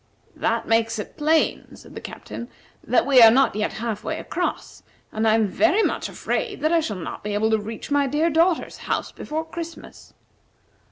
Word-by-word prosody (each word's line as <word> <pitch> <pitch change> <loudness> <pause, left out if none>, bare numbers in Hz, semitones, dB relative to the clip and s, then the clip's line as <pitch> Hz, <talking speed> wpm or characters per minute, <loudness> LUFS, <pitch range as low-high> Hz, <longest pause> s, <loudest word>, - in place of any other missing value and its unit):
"That - - -1
makes 225 0 +2
it 210 - -7
plain," 315 +1 +1
said - - -15
the - - -8
Captain, 235 - -8 0.3
"that - - +2
we 265 -3 +6
are 225 - +11
not 260 -1 +3
yet 210 0 -1
half 220 -2 -4
way 315 - -3
across, 355 +2 -4 0.3
and 220 +1 0
I 220 - +5
am 225 -1 +3
very 335 - +2
much - - -1
afraid 410 - -3
that 310 +2 +2
I 335 - +4
shall 215 -11 -3
not 175 - -7
be 210 0 -3
able 220 +2 +1
to 220 - +3
reach 220 +6 -7
my 285 -1 +3
dear 305 +5 +1
daughter's 330 +2 +1
house - - -1
before 315 +2 -5
Christmas." 335 0 -9
265 Hz, 190 wpm, -23 LUFS, 220-320 Hz, 0.3 s, are